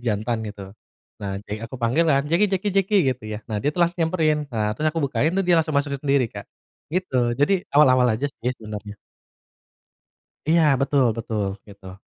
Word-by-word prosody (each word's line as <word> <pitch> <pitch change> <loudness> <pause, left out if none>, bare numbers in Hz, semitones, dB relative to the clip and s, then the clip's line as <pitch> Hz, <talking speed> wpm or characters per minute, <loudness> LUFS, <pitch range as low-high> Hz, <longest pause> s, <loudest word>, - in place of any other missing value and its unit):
jantan 110 +2 -1
gitu. 100 -2 -8 0.5
Nah 100 -1 -4
di 105 0 -5
aku 115 - -9
panggilan, 140 +4 +2
Jeki! 170 +6 +3
Jeki! 190 +2 0
Jeki! 195 +2 +2 0.2
Gitu 125 - -17
ya. 105 - -4
Nah, 110 - -2
dia 145 +5 0
tuh 175 - -3
langsung 175 0 +2
nyamperin. 155 -3 +1
Nah, 105 -1 -1
terus 155 - +1
aku 165 - -2
bukain 145 +4 0
tuh 195 +1 0
dia 175 -1 +4
langsung 160 -1 +1
masuk 140 0 0
sendiri, 140 -4 +2
Kak, 100 0 -8 0.5
gitu. 130 -10 0
Jadi 175 +7 +2
awal-awal 130 -4 +5
aja 145 +5 -2
sih 125 -2 -4
sebenarnya. 105 -1 -8 1.5
Iya, 165 +2 +4 0.2
betul 135 -1 +2
betul, 110 -3 -2 0.2
gitu. 100 -2 -12
135 Hz, 180 wpm, -23 LUFS, 110-160 Hz, 1.5 s, awal-awal